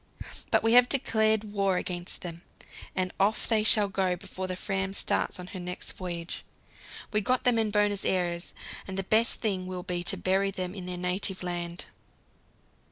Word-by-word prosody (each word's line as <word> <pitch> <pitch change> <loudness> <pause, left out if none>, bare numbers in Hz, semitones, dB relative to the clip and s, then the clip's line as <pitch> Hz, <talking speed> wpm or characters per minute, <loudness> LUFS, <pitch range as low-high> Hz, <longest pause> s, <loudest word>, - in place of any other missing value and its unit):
But - - +3
we 225 0 +4
have 245 0 +7
declared 220 -5 +2
war 195 -2 +2
against 175 -1 -4
them, 170 -1 -7 0.5
and 185 -1 -1
off 205 +3 +2
they 220 -2 +4
shall 210 -1 +5
go 190 -2 0
before 185 +1 -6
the 185 - -2
Fram 190 0 -2
starts - - 0
on 180 - -6
her 185 - -5
next 180 0 -5
voyage. 175 -2 -5 0.7
We 210 - +3
got 250 +5 +1
them 245 -2 +4
in 220 -1 +2
Buenos 205 -1 +2
Aires, 175 -2 0 0.3
and 190 0 -5
the 195 - 0
best 220 +4 +2
thing 190 -5 -1
will 180 -1 -5
be 175 -1 -2
to - - +4
bury 195 +1 +2
them 185 -2 -3
in 185 -3 -7
their 180 0 -3
native 185 +1 0
land. 175 0 -4
190 Hz, 180 wpm, -29 LUFS, 180-210 Hz, 0.7 s, have